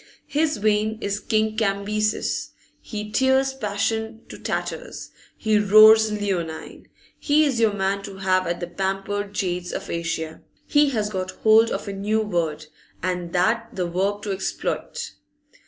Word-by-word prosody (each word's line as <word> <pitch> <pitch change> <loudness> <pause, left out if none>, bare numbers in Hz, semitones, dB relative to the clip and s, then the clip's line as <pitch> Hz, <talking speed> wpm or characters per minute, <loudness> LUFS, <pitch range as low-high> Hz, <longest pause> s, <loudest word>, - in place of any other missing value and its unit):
His 305 0 0
vein 215 +1 +1
is 200 -2 -2
King 215 0 0
Cambyses'; 215 0 -1 0.3
he 210 -1 -6
tears 265 +2 +3
passion 220 -1 -2
to - - -9
tatters; - - -4 0.3
he 215 -1 +2
roars 215 +1 +7
leonine; 190 -6 -4 0.3
he 305 +1 +3
is 265 -5 0
your 220 -2 +3
man 195 0 -1
to 200 -1 -9
have 185 -1 +1
at 175 0 -2
the - - -1
pamper'd 195 +3 -3
jades 180 -1 -2
of - - -5
Asia! 170 -1 -3 0.2
He 290 -1 +4
has 215 -5 -1
got 185 -2 -3 0.2
hold 220 +1 +6
of - - -4
a 200 - -3
new 210 +3 0
word, 165 -7 -2 0.4
and 180 -2 -2
that 225 +6 +1
the 180 - -1
verb 195 +4 -1
to 205 - -3
'exploit. 465 - -3
205 Hz, 150 wpm, -23 LUFS, 190-220 Hz, 0.4 s, roars